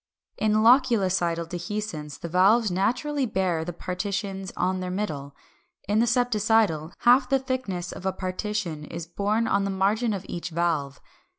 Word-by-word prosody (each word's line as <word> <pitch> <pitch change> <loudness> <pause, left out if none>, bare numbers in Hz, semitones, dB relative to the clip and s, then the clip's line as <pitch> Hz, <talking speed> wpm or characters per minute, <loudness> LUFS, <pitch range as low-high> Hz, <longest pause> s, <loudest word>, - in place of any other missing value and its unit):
] - - -56
372. - - 0
In 215 +1 +3 0.4
loculicidal 170 -3 0
dehiscence 175 -4 -5
the - - -5
valves 195 +5 +4
naturally 255 +9 0
bear 185 -6 0
the 175 - -4
partitions 195 +2 -4
on 185 +1 0
their 185 0 -4
middle; 150 -8 -4 0.5
in 205 +2 +2
the 235 - +3
septicidal, 220 -9 +2
half 250 +2 +5
the 270 - +4
thickness 255 -10 -3
of - - -9
a - - +2
partition 185 -4 -3
is 165 +1 -6
borne 205 +6 0
on 200 0 +2
the 200 - -1
margin 205 +5 +1
of 195 -3 -4
each 175 0 -5
valve. 160 -5 -1
190 Hz, 165 wpm, -26 LUFS, 175-215 Hz, 0.5 s, half